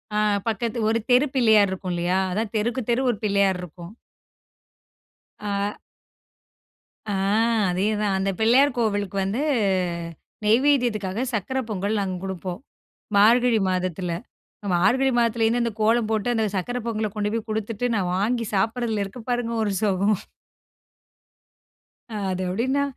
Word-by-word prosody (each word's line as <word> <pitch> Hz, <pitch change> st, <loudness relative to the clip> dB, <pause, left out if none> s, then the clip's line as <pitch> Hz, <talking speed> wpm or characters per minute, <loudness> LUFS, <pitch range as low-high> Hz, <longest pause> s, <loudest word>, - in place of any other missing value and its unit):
ஆ. -, -, +1 dB, 0.3 s
பக்கத்து 230 Hz, +2 st, -1 dB
ஒரு 230 Hz, +1 st, +1 dB
தெரு 255 Hz, +4 st, +6 dB
பிள்ளையார் 220 Hz, -5 st, +5 dB
இருக்கும் 185 Hz, -1 st, -4 dB
இல்லையா? 175 Hz, +2 st, 0 dB
அதான் 215 Hz, +3 st, -2 dB
தெருக்கு 235 Hz, +4 st, -1 dB
தெரு 245 Hz, +3 st, +2 dB
ஒரு 215 Hz, -, -5 dB
பிள்ளையார் 200 Hz, -2 st, +2 dB
இருக்கும். 175 Hz, +2 st, -10 dB, 1.5 s
ஆ. 205 Hz, 0 st, -2 dB, 1.3 s
ஆ. -, -, -1 dB, 0.6 s
அதே 190 Hz, +4 st, 0 dB
தான். 200 Hz, -2 st, +1 dB
அந்த 195 Hz, +1 st, 0 dB
பிள்ளையார் 250 Hz, +5 st, +4 dB
கோவிலுக்கு 205 Hz, -4 st, -1 dB
வந்து 210 Hz, +8 st, -1 dB, 1.0 s
நெய்வதியத்துக்காக, 230 Hz, -4 st, +2 dB
சர்க்கரை 260 Hz, +6 st, -1 dB
பொங்கல் 205 Hz, +1 st, -1 dB
நாங்க 190 Hz, -2 st, -2 dB
குடுப்போம், 185 Hz, -1 st, -5 dB, 0.6 s
மார்கழி 230 Hz, +2 st, +5 dB
மாதத்துல. 185 Hz, -1 st, -2 dB, 0.6 s
மார்கழி 255 Hz, +9 st, +3 dB
மாதத்தில 230 Hz, -1 st, +2 dB
இருந்து 235 Hz, +2 st, +2 dB
அந்த 235 Hz, -, -1 dB
கோலம் 225 Hz, 0 st, +2 dB
போட்டு, 220 Hz, +2 st, 0 dB
அந்த 220 Hz, -1 st, +1 dB
சர்க்கரை 245 Hz, +7 st, -2 dB
பொங்கலகொண்டு 215 Hz, -2 st, -2 dB
போய் 225 Hz, 0 st, -4 dB
குடுத்துட்டு 220 Hz, +2 st, -2 dB
நான் 180 Hz, -3 st, 0 dB
வாங்கி 230 Hz, +4 st, 0 dB
சாப்பட்றதுல 225 Hz, +1 st, 0 dB
இருக்கு 230 Hz, +5 st, -9 dB
பாருங்க 240 Hz, -1 st, -1 dB
ஒரு 205 Hz, -2 st, -1 dB
சுகம். 200 Hz, 0 st, +2 dB, 2.0 s
அது 190 Hz, -2 st, -2 dB
எப்படின்னா, 260 Hz, +8 st, 0 dB
215 Hz, 125 wpm, -24 LUFS, 195-235 Hz, 2.0 s, தெரு